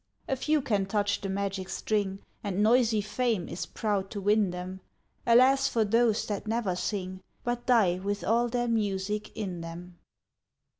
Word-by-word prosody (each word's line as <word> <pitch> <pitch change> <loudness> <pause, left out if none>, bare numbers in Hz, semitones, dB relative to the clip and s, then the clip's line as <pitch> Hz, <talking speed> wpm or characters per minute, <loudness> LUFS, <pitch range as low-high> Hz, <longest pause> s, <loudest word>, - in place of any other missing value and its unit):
A 270 - 0
few 300 +2 +1
can 205 -7 0
touch 205 0 0
the 195 - -3
magic 195 -1 -2
string, 200 -1 -1 0.2
And 200 0 0
noisy 225 -1 +4
Fame 215 -2 -1
is - - -5
proud 205 -3 -1
to 205 - -5
win 205 0 +3
them: 180 +1 -6 0.5
Alas 260 +3 +6
for 225 -2 +1
those 225 +1 +2
that 205 0 -4
never 220 -5 0
sing, 185 -1 -3 0.2
But 240 0 -3
die 205 -8 +4
with 200 +1 -3
all 235 +2 +2
their 240 0 -1
music 210 -1 -1
in 185 -6 -4
them! 170 +1 -9
205 Hz, 160 wpm, -28 LUFS, 190-230 Hz, 0.5 s, Alas